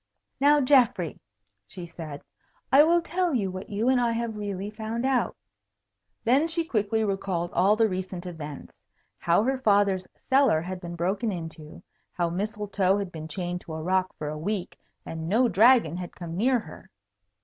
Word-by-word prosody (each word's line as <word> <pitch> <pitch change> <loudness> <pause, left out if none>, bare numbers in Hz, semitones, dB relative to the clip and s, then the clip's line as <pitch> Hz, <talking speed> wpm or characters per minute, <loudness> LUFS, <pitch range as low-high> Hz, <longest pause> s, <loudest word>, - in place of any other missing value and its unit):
"Now, 290 +2 +5
Geoffrey," 250 - +3 0.5
she 180 - -8
said, 155 -4 -8 0.5
"I 275 - +8
will 340 +2 +3
tell 350 -2 0
you 195 -6 0
what 185 +1 -7
you 215 +3 -1
and 260 -1 +4
I 235 -1 +1
have 230 -1 -3
really 205 -1 -4
found 220 +3 -4
out." 265 -2 +1 0.9
Then 265 +7 +3
she 330 0 -1
quickly 220 -4 0
recalled 190 -4 -2
all 195 +4 +4
the 225 0 +3
recent 185 -2 -5
events. 155 -5 -8 0.5
How 170 +4 +3
her 265 +2 0
father's 200 -5 +2 0.2
cellar 265 - +4
had 180 +1 -6
been 175 -1 -6
broken 195 +6 -1
into; 160 -4 -8 0.3
how 170 -1 -1
Mistletoe 200 0 0
had 200 -3 -4
been 160 -2 -7
chained 180 +2 -4
to 160 - -8
a 160 - -5
rock 185 +1 +1
for 150 - -5
a 150 +1 -4
week 190 +2 -3 0.3
and 160 0 -5
no 240 +6 +4
dragon 220 - +4
had 180 -1 -7
come 170 -2 -7
near 250 +7 +3
her. 160 -9 -10
195 Hz, 170 wpm, -26 LUFS, 175-235 Hz, 0.9 s, I